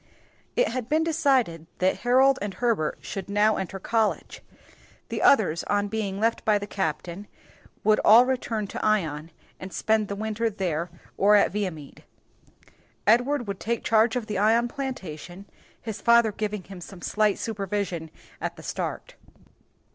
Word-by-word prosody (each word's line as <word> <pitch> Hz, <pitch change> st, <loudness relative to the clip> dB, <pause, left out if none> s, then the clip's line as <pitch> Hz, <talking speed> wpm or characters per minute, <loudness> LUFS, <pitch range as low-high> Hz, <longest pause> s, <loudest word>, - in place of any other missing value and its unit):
It -, -, +2 dB
had 250 Hz, -3 st, -4 dB
been 315 Hz, +1 st, +2 dB
decided 265 Hz, -, +1 dB
that 185 Hz, +1 st, +1 dB
Harold 265 Hz, +2 st, +4 dB
and 205 Hz, -1 st, -4 dB
Herbert 225 Hz, -11 st, 0 dB
should 195 Hz, -1 st, -6 dB
now 210 Hz, +1 st, +3 dB
enter 190 Hz, 0 st, -4 dB
college. 220 Hz, +2 st, -1 dB, 0.7 s
The -, -, -3 dB
others, 205 Hz, -, +4 dB
on 205 Hz, 0 st, 0 dB
being 200 Hz, -2 st, -3 dB
left 225 Hz, +2 st, 0 dB
by 215 Hz, -1 st, +3 dB
the 205 Hz, -, -5 dB
captain, 180 Hz, 0 st, -4 dB, 0.6 s
would 215 Hz, 0 st, +4 dB
all 230 Hz, +4 st, +8 dB
return 240 Hz, -4 st, -2 dB
to -, -, -5 dB
Ion 165 Hz, -8 st, 0 dB, 0.3 s
and 185 Hz, -, -8 dB
spend 220 Hz, +1 st, +1 dB
the 200 Hz, -, -4 dB
winter 220 Hz, +2 st, -1 dB
there 180 Hz, -5 st, -2 dB, 0.3 s
or 205 Hz, +2 st, +5 dB
at 205 Hz, -, +4 dB
Viamede. 180 Hz, -8 st, -5 dB, 1.0 s
Edward 245 Hz, +5 st, +3 dB
would 200 Hz, -1 st, -4 dB
take 235 Hz, 0 st, -2 dB
charge 225 Hz, +2 st, +3 dB
of 245 Hz, -3 st, -2 dB
the 210 Hz, -3 st, -3 dB
Ion 225 Hz, +3 st, +3 dB
plantation, 195 Hz, -, -7 dB, 0.3 s
his 220 Hz, -2 st, -6 dB
grandfather 235 Hz, 0 st, +4 dB
giving 210 Hz, -1 st, -4 dB
him 190 Hz, -1 st, -11 dB
some 175 Hz, 0 st, -11 dB
slight 215 Hz, -2 st, +1 dB
supervision 195 Hz, -6 st, -3 dB, 0.3 s
at -, -, -3 dB
the -, -, -12 dB
start. -, -, -5 dB
210 Hz, 155 wpm, -25 LUFS, 190-230 Hz, 1.0 s, all